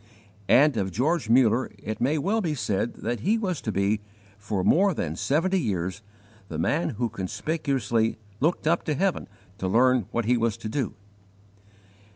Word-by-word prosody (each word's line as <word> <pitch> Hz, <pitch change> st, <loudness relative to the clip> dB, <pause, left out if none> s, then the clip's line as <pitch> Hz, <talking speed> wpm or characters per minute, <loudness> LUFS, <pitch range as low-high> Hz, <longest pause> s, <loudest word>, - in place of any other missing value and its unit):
And 145 Hz, -1 st, +5 dB
of 95 Hz, -2 st, 0 dB
George 135 Hz, -, 0 dB
Muller 120 Hz, 0 st, +4 dB
it 110 Hz, +2 st, -6 dB
may 140 Hz, +6 st, +2 dB
well 205 Hz, +10 st, 0 dB
be 160 Hz, -6 st, -1 dB
said 105 Hz, -1 st, -1 dB
that 120 Hz, 0 st, -1 dB
he 210 Hz, -, +2 dB
was 185 Hz, -8 st, -2 dB
to 110 Hz, -, -2 dB
be, 100 Hz, +2 st, +1 dB, 0.3 s
for 105 Hz, -2 st, -3 dB
more 190 Hz, -, +4 dB
than 80 Hz, -, -3 dB
seventy 165 Hz, -, +1 dB
years, 95 Hz, -, -2 dB, 0.5 s
the 80 Hz, -, -6 dB
man 85 Hz, +2 st, +1 dB
who 120 Hz, -, 0 dB
conspicuously 115 Hz, -, -1 dB, 0.2 s
looked 160 Hz, +3 st, 0 dB
up 170 Hz, +2 st, +2 dB
to 150 Hz, -, 0 dB
heaven 190 Hz, +5 st, 0 dB, 0.3 s
to 95 Hz, -, -1 dB
learn 125 Hz, +2 st, +3 dB
what 120 Hz, -1 st, -1 dB
he 125 Hz, +2 st, +3 dB
was 115 Hz, -2 st, 0 dB
to -, -, -6 dB
do. 120 Hz, -2 st, -2 dB
120 Hz, 170 wpm, -26 LUFS, 105-155 Hz, 0.5 s, And